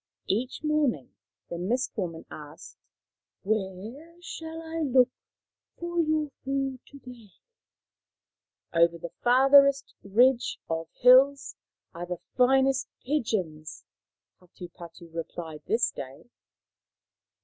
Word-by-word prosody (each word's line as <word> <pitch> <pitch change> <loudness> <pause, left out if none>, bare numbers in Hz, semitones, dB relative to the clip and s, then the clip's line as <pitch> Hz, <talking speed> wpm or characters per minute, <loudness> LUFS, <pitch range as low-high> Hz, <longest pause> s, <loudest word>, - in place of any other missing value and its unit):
Each 245 +9 -2
morning 300 - 0 0.3
the 170 - -6
Mist 240 +8 -1
woman 170 -6 -4
asked, 150 +3 -11 0.4
" - - -65
Where 220 - -4
shall 325 -2 -7
I 330 0 -6
look 260 -4 +3 0.7
for 345 0 -3
your 310 -2 +1
food 270 -1 -2
to 280 - -13
day? 245 -5 -13 0.4
" - - -66
" - - -42
Over 170 0 +4
the 170 0 -8
farthest 275 +2 +5
ridge 240 +5 +3
of 165 0 -3
hills 265 +3 +5 0.4
are 175 +1 -6
the 180 0 -4 0.2
finest 265 +1 +3 0.2
pigeons," 190 - -2 0.6
Hatupatu 170 -1 -13
replied 165 -1 -6
this 230 0 +2
day. 135 - -10
245 Hz, 110 wpm, -27 LUFS, 175-275 Hz, 0.7 s, farthest